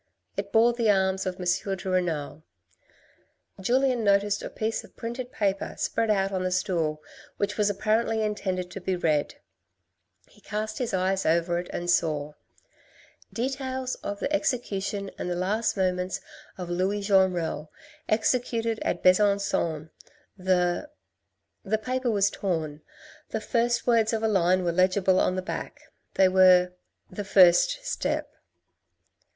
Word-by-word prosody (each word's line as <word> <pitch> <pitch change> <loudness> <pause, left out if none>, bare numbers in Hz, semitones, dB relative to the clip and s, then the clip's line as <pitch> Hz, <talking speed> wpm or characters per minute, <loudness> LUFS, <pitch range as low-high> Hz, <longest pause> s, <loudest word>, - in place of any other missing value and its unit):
It - - -4
bore 230 +2 +5
the 230 -2 +1
arms 190 -1 +2
of 185 0 -4
M. 180 - -4 0.3
de 190 - -9
Renal. 165 -5 -1 1.2
Julien 250 +3 +2
noticed 200 0 +2
a - - -5
piece 220 +1 -3
of - - -17
printed 240 +2 -5
paper 195 -2 -1
spread 225 -1 -1
out 195 -2 +2
on 185 -1 -2
the 185 - 0
stool, 165 -4 -1 0.3
which 205 0 -1
was 210 -1 +2
apparently 220 +2 0
intended 185 -4 -2
to 195 - -7
be 185 +1 -1
read, 155 -4 0 0.9
he - - -23
cast 215 0 -4
his 245 -3 -2
eyes 190 +1 0
over 170 +1 +1
it 175 - -7
and 175 - -4
saw: 150 -4 +1 0.3
— - - -33
" - - -25 0.3
Details 260 +1 -3
of 200 0 -5
the 290 - -2
execution 205 -9 -1
and - - -3
the 175 - -1
last 205 +5 0
moments 185 -1 0 0.4
of 180 -2 -5
Louis 190 +4 0
Jenrel, 185 -6 +1 0.4
executed 230 0 0
at 175 - -2
Besan^on 185 -5 +2 0.4
the.. 180 +7 0 0.4
." - - -53
The 215 +2 0
paper 255 +3 -2
was 200 -2 +2
torn. 160 -6 -3 0.5
The 220 - -2
two - - -12
first 235 0 +1
words 230 -2 +3
of 225 0 -1
a - - +3
line 185 -3 +2
were 175 - +1
legible 185 +1 +3
on 185 - +1
the 185 - -3
back, - - -6 0.4
they 190 - +5
were, 185 -1 +5 0.2
" - - -38
The 205 +3 -5
First 195 - +5
Step." - - -2
195 Hz, 155 wpm, -26 LUFS, 180-220 Hz, 1.2 s, bore